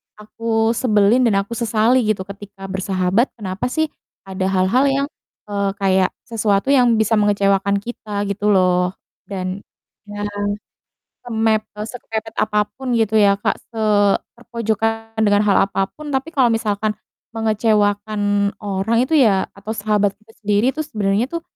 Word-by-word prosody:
aku 225 +1 -1
sebelin 235 0 +3
dan 200 -3 +2
aku 200 - -23
sesali 230 +2 +3
gitu 205 -3 0
ketika 200 0 -11
bersahabat, 190 +4 +1
kenapa 195 -1 -4
sih 315 +3 -1 0.3
ada 190 0 -3
hal-hal 190 +7 +2
yang, 275 +1 +1 0.4
eee, 200 -1 0
kayak 190 -2 +2 0.2
sesuatu 220 +2 0
yang 245 -4 +5
bisa 220 0 +1
mengecewakan 200 -1 +2
kita, 205 -1 -5
gitu 200 +1 -2
loh. 180 0 +2 0.3
Dan 185 -1 -4 0.5
iya, 205 0 -6 1.0
semep 220 -2 +1 0.2
eee, 210 - -3
sekepepet 225 -1 -6
apapun 210 +5 -1
gitu 220 -1 +1
ya, 200 -2 +4
Kak, - - 0 0.2
seterpojokan 225 +1 -1
dengan 205 -1 +4
hal 200 - +4
apapun, 245 +11 -3
tapi 280 +4 -2
kalau 255 -4 +4
misalkan 215 -1 -1 0.4
mengecewakan 205 -2 +1
orang 205 +2 -1
itu 320 - -1
ya, 210 -8 +4
atau 200 +2 -9
sahabat 205 -1 +1
kita 220 +1 -22
sendiri 210 +4 +2
tuh, 310 - -2
sebenarnya 210 -2 0
tuh, 335 -1 -4
210 Hz, 135 wpm, -20 LUFS, 200-225 Hz, 1.0 s, yang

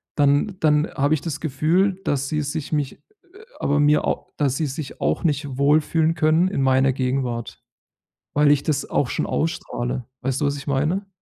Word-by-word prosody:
dann 145 +7 +2
dann 150 0 +3
habe 145 +2 +2
ich 145 - -5
das 160 -5 -4
Gefühl, 165 +6 +1
dass 140 -1 0
sie 155 -1 0
sich 150 +1 -4
mich 145 -3 -1 0.4
äh, 430 - -14 0.2
aber 145 +1 +1
mir 150 +1 +3
au - - -2
dass 140 -3 +1
sie 160 - -1
sich 140 0 -6
auch - - 0
nicht 145 -4 -1
wohlfühlen 155 +3 +3
können 160 +3 +3
in 140 -8 -1
meiner 130 0 +3
Gegenwart, 125 -3 -2 0.7
weil 150 0 +4
ich 145 -1 +2
das 150 -3 -1
auch 135 - +1
schon - - -2
ausstrahle. 125 -6 -2 0.2
Weißt 135 +2 -2
du, - - +2
was 140 0 0
ich 140 - -9
meine? 155 +9 0
145 Hz, 185 wpm, -22 LUFS, 135-155 Hz, 0.7 s, weil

